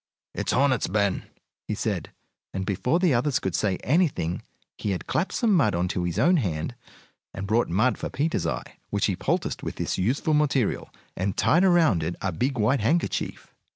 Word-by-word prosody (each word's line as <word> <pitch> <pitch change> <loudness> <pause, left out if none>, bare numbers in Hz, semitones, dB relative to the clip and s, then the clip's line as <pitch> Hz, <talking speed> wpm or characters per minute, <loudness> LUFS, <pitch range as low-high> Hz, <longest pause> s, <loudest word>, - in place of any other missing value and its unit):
"It's - - -2
hornets, 130 -3 +2
Ben!" 100 -1 0 0.4
he - - -1
called; - - -2 0.5
and 95 0 -2
before 105 - +1
the 180 -5 +3
others 125 +3 +2
could 95 - -2
say 95 -1 +1
anything 140 - +1 0.3
he 105 - -3
had 90 - -5
clapped 175 - 0
some 230 -4 +2
mud 130 - +3
on 90 +1 0
his 90 -1 -2
own 175 +5 +4
hand 90 - -2 0.6
and 95 - -4
brought 110 +4 +1
mud 110 +9 +2
for - - -3
Peter's 155 +4 -1
eye, - - -5
which - - +1
he - - +1
poulticed - - -1
with - - -5
this - - -2
useful 130 - +1
material, 145 -6 +1 0.3
and 95 +1 -2
tied 175 +3 +4
around 170 - +4
it 80 +3 -2
a 95 - -1
big 125 - -1
white 115 +6 +2
handkerchief. 150 +11 -1
120 Hz, 185 wpm, -26 LUFS, 95-150 Hz, 0.6 s, own